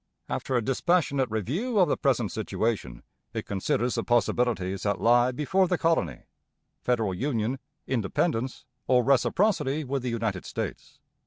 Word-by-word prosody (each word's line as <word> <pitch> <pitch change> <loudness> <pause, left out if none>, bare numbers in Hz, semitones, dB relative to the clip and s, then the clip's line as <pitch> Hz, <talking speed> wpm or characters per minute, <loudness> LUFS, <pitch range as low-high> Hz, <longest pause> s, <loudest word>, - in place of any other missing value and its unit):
After 130 - -2
a 120 - +2
dispassionate 135 0 +1
review 150 - -2
of 185 -3 +5
the - - +1
present 125 -7 +1
situation, 110 - -2 0.3
it - - -3
considers 105 +5 0
the - - -1
possibilities 120 -5 +1
that 100 -2 0
lie 120 +4 +4
before 165 +8 +1
the 180 0 +1
colony 160 - 0 0.6
federal 115 -6 0
union, 120 +2 -1 0.3
independence, 130 - -1 0.2
or 125 -1 +4
reciprocity 150 - +2
with 135 0 -2
the 125 - -2
United 110 -5 -2
States. - - -6
125 Hz, 140 wpm, -27 LUFS, 110-140 Hz, 0.6 s, of